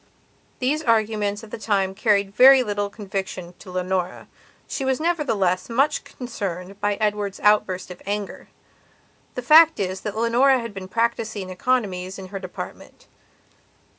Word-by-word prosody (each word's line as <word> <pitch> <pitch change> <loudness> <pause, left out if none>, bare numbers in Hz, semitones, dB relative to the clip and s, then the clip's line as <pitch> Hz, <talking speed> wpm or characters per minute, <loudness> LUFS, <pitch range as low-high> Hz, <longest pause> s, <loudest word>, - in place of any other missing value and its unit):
These 280 +5 0
arguments 215 -4 0
at 215 - -12
that - - -7
time 195 -3 0
carried 200 -1 +1
very 260 +2 +8
little 205 -2 -2
conviction 190 -4 -6
to 195 - -12
Leonora. 185 0 -2 0.4
She 275 - -4
was, 265 0 0
nevertheless, 225 - 0
much 275 +6 +1
concerned 200 -6 -6
by 205 0 +1
Edward's 210 -2 -2
outburst 190 -3 +2
of 180 - -11
anger. 205 0 -4 0.9
The 250 - -4
fact 320 +4 +7
is 190 -1 -2
that 210 0 -5
Leonora 245 +4 +4
had 230 -3 -6
been 190 -1 -7
practising 220 -3 -2
economies 190 -3 -1
in 190 -1 -9
her 195 0 -5
department. 185 -2 -9
205 Hz, 140 wpm, -23 LUFS, 190-235 Hz, 0.9 s, very